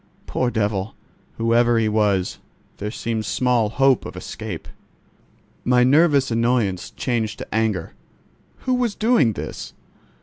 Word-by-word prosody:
Poor 125 - 0
devil! 105 -3 -1 0.4
whoever 115 +1 +3
he 110 -1 +2
was, 105 -4 +1 0.4
there 105 - -4
seemed 110 0 -3
small 120 -2 +1
hope 135 +2 +3
of - - -8
escape! - - -7 1.0
My 125 0 +4
nervous 140 -1 +4
annoyance 115 -5 +1
changed 115 -4 -2
to - - -8
anger. 110 -6 -1 0.7
Who 255 - 0
was 245 -4 0
doing 220 - +3
this? - - -7
115 Hz, 125 wpm, -22 LUFS, 110-130 Hz, 1.0 s, My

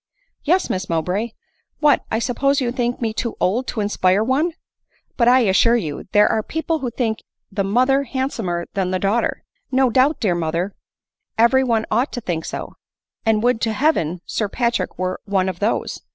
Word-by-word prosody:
" - - -48
Yes, 355 +5 +2
Miss 185 0 -3
Mowbray! 180 +7 -1 0.5
What, 295 -2 +3
1 220 - -1
suppose 275 +3 +1
you 245 -3 0
think 245 0 -2
me 225 -2 -1
too 235 +1 -3
old 235 +8 +1
to 220 - -2
inspire 205 -1 +2
one 285 +8 +1 0.3
!— - - -42
*But, 235 - +2
I 255 +1 +6
assure 230 +2 +4
you, 155 -11 -3
there 210 0 +5
are 220 - +1
people 320 +6 -2
who 255 - -2
think 225 -2 -2 0.3
the 195 0 -1
mother 255 +7 +3
handsomer 225 -10 -2
than 190 -3 -1
the 185 - 0
daugh 200 +5 +2
ter - - -3
!" - - -48
" - - -48
No 260 -1 +3
doubt, 265 +6 +3
dear 200 -7 +1
mother, 170 +3 -2 0.6
every 235 +4 +5
one 230 -3 +1
ought 255 +4 +1
to 245 - -4
think 170 -6 -3
so - - -6 0.3
— - - -53
and 220 -1 +3
would 245 -2 +2
to 225 -1 0
Heaven 180 - +1
Sir 210 -2 -2
Patrick 235 -5 -1
were 185 0 -2
one 195 -2 +1
of 185 -2 -4
those 210 +3 -1
225 Hz, 205 wpm, -21 LUFS, 190-255 Hz, 0.6 s, I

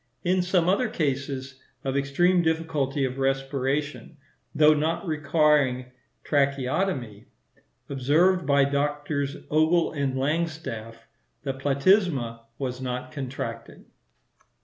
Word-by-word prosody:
In 180 +1 +2
some 180 -1 +1
other 210 +6 +2
cases 135 - -3 0.2
of 135 0 -2
extreme 175 +7 +2
difficulty 160 -4 0
of 130 +1 -4
respiration, 135 +3 -2 0.4
though 150 +1 +6
not 155 +5 -1
requiring 150 -5 +2 0.3
tracheotomy, 140 - -1 0.6
observed 160 +7 +2
by 140 -1 +4
Drs. 145 0 -1
Ogle 160 +3 +3
and 140 -3 -2
Langstaff, 130 -6 -3 0.4
the 135 -2 -2
platysma 140 - +2 0.2
was 130 -2 -4
not 125 0 -4
contracted. 125 -4 -6
140 Hz, 100 wpm, -26 LUFS, 130-160 Hz, 0.6 s, though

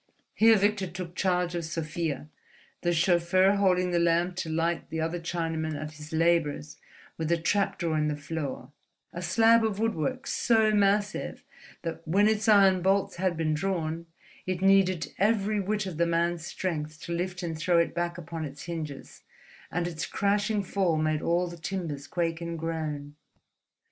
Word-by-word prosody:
Here 225 0 +6
Victor 200 -1 +1
took 175 0 -7
charge 180 -2 0
of 170 -1 -2
Sofia, 160 -2 -3 0.5
the 175 - +1
chauffeur 175 +3 +3
holding 180 -2 +2
the 175 - +2
lamp 170 +1 +2
to 185 -4 -3
light 165 +1 -1
the 160 - -3
other 165 +2 -1
Chinaman 165 -2 -2
at 155 0 -5
his 150 0 -11
labours 160 -3 +1 0.4
with 160 0 -1
a 170 - +4
trap 195 +5 0
door 165 -3 -1
in 150 - +1
the 150 - -1
floor, 145 -2 -5 0.4
a 175 - -5
slab 225 +6 +4
of 215 -3 0
woodwork 225 - -1
so 220 -2 +3
massive 205 0 +1 0.4
that, 165 -1 -4
when 200 +6 +4
its 220 +1 +1
iron 195 -3 +6
bolts 195 +1 +1
had 180 -2 0
been 155 -1 0
drawn, 165 -1 -2 0.4
it 185 -1 -1
needed 195 -3 +3
every 210 0 +2
whit 205 +1 -1
of 180 -5 -5
the 170 0 +2
man's 170 0 0
strength 155 -4 -4
to - - -7
lift 180 +1 -3
and 165 -2 -3
throw 170 +2 +2
it 170 - +2
back 175 0 -2
upon 165 -1 -6
its 140 -1 -7
hinges; 155 -5 -6 0.5
and 175 0 -1
its 155 -4 -4
crashing 205 +1 0
fall 185 -3 0
made 155 0 0
all 175 +1 +1
the 170 0 -8
timbers 165 -5 -4
quake 165 -1 -2
and 170 0 -4
groan. 155 -3 -4
170 Hz, 170 wpm, -28 LUFS, 160-195 Hz, 0.5 s, Here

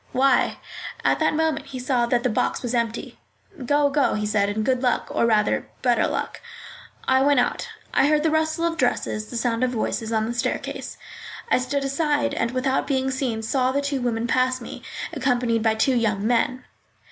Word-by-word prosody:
"Why?" 270 +2 +3 0.5
At - - +3
that 315 -1 +2
moment 320 -2 0
he 260 - -7
saw 250 -2 +1
that 240 0 +1
the 250 - +2
box 215 - -1
was 245 0 -2
empty. 235 -1 -2 0.4
"Go, 285 +2 +2
go," 285 -2 +2
he 210 0 -1
said, 210 -1 +1
"and 215 +1 -2
good 255 -1 +1
luck, 250 -2 0
or 230 - +2
rather 215 -2 +2 0.2
better 240 -3 +3
luck." - - -4 0.7
I 260 0 +4
went 285 -1 +4
out. 460 - -1 0.2
I 270 - +4
heard 300 0 +3
the 320 - +2
rustle 315 +1 +1
of 335 -1 -1
dresses, 215 -3 0
the 240 - -5
sound 235 0 0
of 255 - +2
voices, 225 -1 -2
on 220 -1 +1
the 235 - -3
staircase. 240 - -3 0.5
I - - +5
stood 275 +2 -1
aside, 290 +1 0
and, 230 - 0
without 255 +2 0
being 265 -1 0
seen, 255 -5 -2
saw 255 +3 +1
the 280 - 0
two 280 -2 -2
women 235 -1 -1
pass 255 +2 +1
me, 235 - -8 0.3
accompanied 245 -3 +1
by 220 0 +2
two 260 +4 +2
young 215 -4 0
men. 245 +2 +1
255 Hz, 195 wpm, -23 LUFS, 230-275 Hz, 0.7 s, I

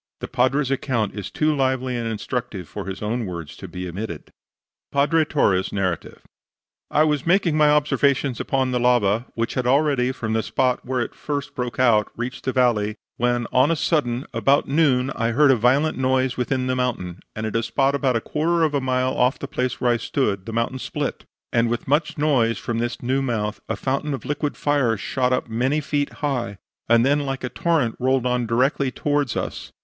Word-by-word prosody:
The - - -5
Padre's 130 +2 +1
account 120 -6 -1
is 105 - -6
too 155 0 +1
lively 130 -2 0
and 120 -1 -2
instructive 110 -4 -4
for 100 -2 -7
his 95 +2 -5
own 115 +1 -2
words 85 -5 -7
to - - -8
be 90 0 -6
omitted. 90 -2 -6 0.6
PADRE 150 +3 +3
TORRE'S 95 -12 +1
NARRATIVE 95 -4 -3 0.7
"I 150 - +3
was 150 -1 0
making 175 -3 +3
my 150 -1 +5
observations 140 -3 +2
upon 130 -1 0
the 125 - 0
lava, 120 -2 +2
which 115 0 -1
had 125 -1 -1
already, 135 -2 +2
from 110 -4 -3
the 110 - +2
spot 125 +2 0
where 130 -1 -1
it - - -4
first 145 -2 -4
broke 125 -1 -4
out, 115 -4 +3
reached 120 +2 -5
the 130 - +1
valley, 115 -5 +2 0.2
when, 120 0 +1
on 130 +4 +4
a 165 - +2
sudden, 140 -6 0
about 140 +1 +2
noon, 135 -3 +2
I 115 -2 -1
heard 145 +2 +5
a - - +5
violent 130 +6 +2
noise 130 -1 +1
within 130 +1 -1
the 130 0 0
mountain, 110 -9 -2 0.2
and 110 - -3
at 110 - -4
a 115 - +2
spot 135 +4 +1
about 135 -3 +1
a 115 - +1
quarter 165 +5 0
of 155 -2 +1
a 140 - +1
mile 130 0 0
off 125 +1 +2
the - - -6
place 125 +1 -2
where 125 -2 +2
I 120 - +2
stood 105 -6 -1
the - - -4
mountain 115 +3 -1
split; - - -4 0.3
and 115 0 +3
with 120 0 -3
much 150 +5 +1
noise, 130 -7 +2
from 115 -1 -3
this 120 +1 -3
new 130 +3 +1
mouth, 110 -5 -2
a - - 0
fountain 140 +2 -1
of - - -10
liquid 145 0 -2
fire 140 -6 +1
shot 125 +4 -1
up 125 - 0
many 125 +6 0
feet 145 -1 -1
high, 120 -8 -2 0.3
and 115 +1 +5
then 145 +2 +3
like 135 -2 -3
a 125 - -2
torrent 155 -9 0
rolled 130 0 +1
on 125 -1 0
directly 130 +4 +1
towards 145 -1 -1
us. - - -4
125 Hz, 205 wpm, -23 LUFS, 115-140 Hz, 0.7 s, my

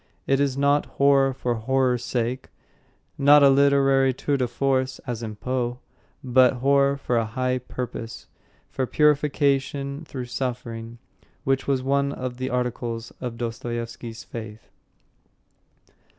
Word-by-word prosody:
It 135 0 +2
is 140 -2 0
not 140 +1 +2
horror 140 -1 +4
for 125 -2 -2
horror's 125 +1 0
sake, 125 +1 -2 0.7
not 145 +1 +7
a 140 - +7
literary 135 -1 +4
tour 145 +2 -1
de 130 -2 0
force, 130 +1 0
as 120 -3 -4
in 110 -2 -5
Poe, 125 +1 -2 0.5
but 130 0 +4
horror 140 +2 +2
for 125 -3 -1
a 115 - +1
high 130 +3 -1
purpose, 120 -2 -6 0.5
for 130 - -2
purification 140 -1 +1
through 130 -4 -6
suffering, 120 -2 -5 0.5
which 135 0 0
was 135 -2 +1
one 140 +1 +1
of 125 -2 -5
the 130 +1 -3
articles 120 -2 -3
of 120 -2 -5
Dostoyevsky's 115 0 -5
faith. 110 -1 -9
130 Hz, 130 wpm, -24 LUFS, 120-140 Hz, 0.7 s, not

